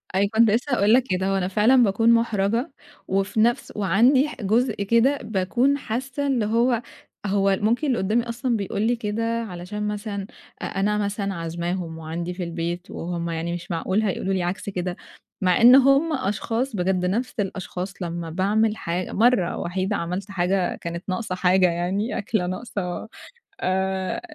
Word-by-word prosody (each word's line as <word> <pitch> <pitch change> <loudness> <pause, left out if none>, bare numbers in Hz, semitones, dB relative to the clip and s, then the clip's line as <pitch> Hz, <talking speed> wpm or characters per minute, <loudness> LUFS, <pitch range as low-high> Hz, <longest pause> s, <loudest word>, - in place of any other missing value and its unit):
أيوه، 200 +1 +2
كُنت 225 0 +5
لسّه 250 +5 0
هاقول 210 -1 +4
لك 255 0 +5
كده، 185 +1 0
هو 195 0 +1
أنا 180 -1 0
فعلًا 225 +6 +4
باكون 225 +2 +3
مُحرَجة 230 +3 +1 0.4
وفي 195 +3 0
نفس 235 +2 +1
وعندي 235 - +4
ح - - -8
جزء 230 +6 +2
كده 235 +7 +3
باكون 235 +7 +1
حاسَّة 265 +3 -3
إن 255 -5 +1
هو 235 +2 +2 0.4
هو 195 -1 +2
ممكن 240 +8 +1
اللي 255 - +1
قُدّامي 215 +5 +1
أصلًا 240 0 -1
بيقول 200 0 -3
لي 235 +2 +2
كده 225 -1 -3 0.2
علشان 205 +2 -5
مثلًا 205 -1 -4 0.3
أ - - -3
أنا 205 +2 0
مثلًا 200 -1 -2
عازماهم 170 0 -4
وعندي 165 +2 -4
في 180 0 -5
البيت 170 +1 -4
وهُم 170 0 -4
يعني 165 +1 -3
مش 175 0 -6
معقول 185 +5 0
هيقولوا 195 -2 -1
لي 185 -2 0
عكْس 180 +3 -3
كده. 180 -1 -3 0.4
مع 185 +2 +3
إن 245 +2 +9
هُم 275 +4 +5
أشخاص، 225 +3 -2
بجد 180 -1 0
نفْس 230 +7 -1
الأشخاص 190 -1 -4
لمّا 170 -1 -4
باعمل 210 +5 +1
حا 175 +2 -2
مرَّة 225 -5 +2
وحيدة 185 +3 -2
عملْت 180 +3 -4
حاجة 185 0 0
كانت 170 +1 -6
ناقصة 185 0 -2
حاجة 185 0 +4
يعني، 185 +7 -1
أكلة 205 -2 -1
ناقصة 185 -1 -4 0.5
آآ 190 0 -1
200 Hz, 165 wpm, -24 LUFS, 180-230 Hz, 0.5 s, إن